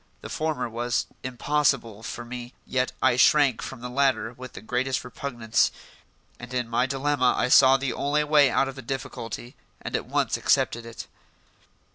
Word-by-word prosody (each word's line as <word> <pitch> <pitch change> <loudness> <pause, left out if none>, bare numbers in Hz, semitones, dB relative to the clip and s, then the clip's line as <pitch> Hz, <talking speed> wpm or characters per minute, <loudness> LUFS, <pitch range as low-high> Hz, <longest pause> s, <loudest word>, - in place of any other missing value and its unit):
The - - -8
former 155 -6 -2
was 120 +1 -1 0.2
impossible 130 -4 0
for 120 +1 -6
me, 120 0 -8
yet 130 0 -1
I 120 - +4
shrank 140 -2 +4
from 130 -3 -7
the 125 - -5
latter 130 -2 +1
with 130 +1 -10
the - - -9
greatest 125 +1 -1
repugnance; 120 -2 0 0.7
and 120 +1 -10
in 125 -2 -1
my 120 +2 +1
dilemma 135 -1 +1
I - - +1
saw 135 +1 +7
the 135 -2 -2
only 145 +4 0
way 150 -2 +5
out 135 - +2
of 135 - -5
the 135 - -9
difficulty 120 -1 -6 0.2
and - - -5
at - - -3
once - - 0
accepted 115 0 +1
it. 115 - -8
125 Hz, 170 wpm, -25 LUFS, 120-135 Hz, 0.7 s, saw